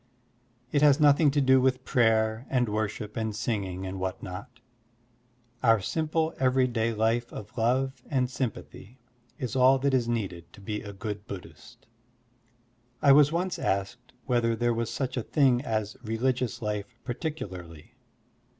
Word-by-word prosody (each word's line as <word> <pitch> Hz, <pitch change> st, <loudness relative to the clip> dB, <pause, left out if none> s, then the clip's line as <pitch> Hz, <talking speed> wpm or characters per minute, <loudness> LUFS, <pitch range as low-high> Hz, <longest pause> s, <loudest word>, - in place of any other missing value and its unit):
It 145 Hz, -, +2 dB
has 145 Hz, -1 st, +6 dB
nothing 145 Hz, 0 st, +5 dB
to 145 Hz, +1 st, +1 dB
do 130 Hz, -1 st, +5 dB
with 130 Hz, 0 st, +1 dB
prayer 110 Hz, 0 st, +2 dB
and 125 Hz, -2 st, +1 dB
worship 105 Hz, 0 st, -3 dB
and 110 Hz, -3 st, -2 dB
singing 95 Hz, -4 st, -3 dB
and 95 Hz, 0 st, -5 dB
what 95 Hz, 0 st, -4 dB
not. 115 Hz, +7 st, -8 dB, 1.0 s
Our 115 Hz, -3 st, +5 dB
simple 160 Hz, -, -1 dB
everyday 125 Hz, -3 st, +2 dB
life 115 Hz, +2 st, 0 dB
of 105 Hz, +3 st, -9 dB
love 130 Hz, +3 st, 0 dB
and 130 Hz, -3 st, +1 dB
sympathy 125 Hz, -3 st, -6 dB, 0.4 s
is 130 Hz, +1 st, -4 dB
all 130 Hz, +1 st, +6 dB
that 140 Hz, +1 st, 0 dB
is 125 Hz, -3 st, +2 dB
needed 95 Hz, -8 st, -3 dB
to -, -, -14 dB
be 105 Hz, +1 st, -4 dB
a 100 Hz, -, -8 dB
good 105 Hz, +1 st, -6 dB
Buddhist. 95 Hz, -3 st, -11 dB, 1.1 s
I 140 Hz, -, +5 dB
was 145 Hz, +1 st, +6 dB
once 175 Hz, +2 st, -1 dB
asked 95 Hz, 0 st, -2 dB
whether 120 Hz, -2 st, +1 dB
there 120 Hz, +1 st, +1 dB
was 115 Hz, 0 st, -2 dB
such 130 Hz, -1 st, -3 dB
a -, -, +1 dB
thing 130 Hz, -1 st, +2 dB
as 110 Hz, -5 st, -2 dB
religious 125 Hz, +1 st, -1 dB
life 105 Hz, +2 st, -3 dB
particularly. 95 Hz, -, -6 dB
120 Hz, 150 wpm, -28 LUFS, 105-130 Hz, 1.1 s, has